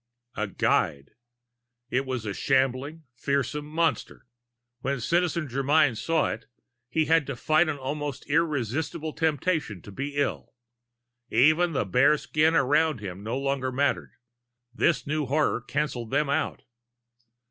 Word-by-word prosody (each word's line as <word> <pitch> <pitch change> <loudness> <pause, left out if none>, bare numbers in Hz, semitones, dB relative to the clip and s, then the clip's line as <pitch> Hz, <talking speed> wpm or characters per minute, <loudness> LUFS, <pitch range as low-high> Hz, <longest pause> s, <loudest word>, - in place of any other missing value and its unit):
A 105 - -1
guide! 70 -7 0 0.8
It 130 +2 0
was 130 -4 -3
a 100 - -2
shambling, 135 +6 0
fearsome 140 +3 -2
monster! 155 -7 -1 0.5
When 135 +1 -2
Citizen 170 +3 0
Germyn 140 +1 +2
saw 165 +8 +1
it, 115 +2 -7 0.4
he 155 +5 +1
had 160 -2 +3
to 140 - -3
fight 155 +6 +2
an 145 - -2
almost 145 +1 -4
irresistible 150 0 -1
temptation 160 - 0
to 100 - -10
be 140 +7 -5
ill. 145 -2 -2 0.7
Even 155 +8 +4
the 130 - 0
bare 125 +10 +4
skins 155 +2 +1
about 150 +1 +2
him 95 -2 -7
no 115 +5 -3
longer 135 -1 -1
mattered; 140 +2 0 0.6
this 130 0 +1
new 150 -1 -1
horror 145 -2 +1
canceled 125 -3 -3
them 140 +2 +1
out. 155 +2 -1
140 Hz, 135 wpm, -26 LUFS, 125-155 Hz, 0.8 s, Even